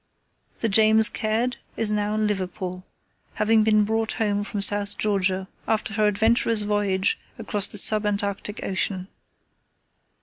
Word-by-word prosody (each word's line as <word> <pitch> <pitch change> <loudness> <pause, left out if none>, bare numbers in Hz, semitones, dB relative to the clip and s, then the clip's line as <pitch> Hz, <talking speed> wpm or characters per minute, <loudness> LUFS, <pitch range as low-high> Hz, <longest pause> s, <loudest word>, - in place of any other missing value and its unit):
The 230 - +1
James 220 +1 +5
Caird 230 +3 -2 0.2
is 220 -2 +3
now 210 0 -1
in 215 0 0
Liverpool, 185 -2 -4 0.5
having 215 +1 +3
been 215 -1 +3
brought 220 +1 -1
home 205 -3 -1
from 205 0 -5
South 205 0 +2
Georgia 190 -2 0 0.2
after 220 0 -1
her 215 0 +2
adventurous 220 +1 +1
voyage 205 -2 0 0.2
across 210 -3 -1
the - - -3
sub 210 +1 +2
Antarctic 205 +1 -2
ocean. 190 0 -2
210 Hz, 135 wpm, -23 LUFS, 200-220 Hz, 0.5 s, James